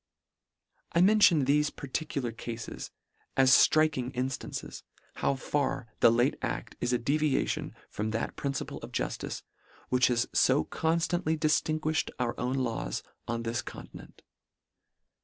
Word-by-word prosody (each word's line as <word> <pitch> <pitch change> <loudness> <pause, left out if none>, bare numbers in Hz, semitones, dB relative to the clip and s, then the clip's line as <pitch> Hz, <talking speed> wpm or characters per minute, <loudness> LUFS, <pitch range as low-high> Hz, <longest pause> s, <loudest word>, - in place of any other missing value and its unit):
I 170 - +4
mention 185 -7 +6
thefe 150 +2 +2
particular 140 -3 -3
cafes 115 0 -6 0.5
as 130 0 +7
fink 155 -3 +2
ing 125 0 -2
instances, 130 +1 -4 0.4
how 140 - +1
far 135 -2 -1
the - - +7
late 120 +4 +2
aft - - -4
is 120 - 0
a 125 - +3
devi 145 +3 +1
ation - - -2
from 110 +1 -3
that 115 +1 -2
principle 140 -1 -3
of - - -9
juftice, - - -3 0.5
which 125 -1 +4
has 120 -1 +2
fo 130 +3 +4
constantly 165 0 0
diftinguifhed 155 0 +1
our 120 -2 0
own 125 +2 -1
laws 115 - -2 0.2
on 120 -1 -2
this 115 +1 -1
continent. - - -11
135 Hz, 135 wpm, -29 LUFS, 120-155 Hz, 0.5 s, as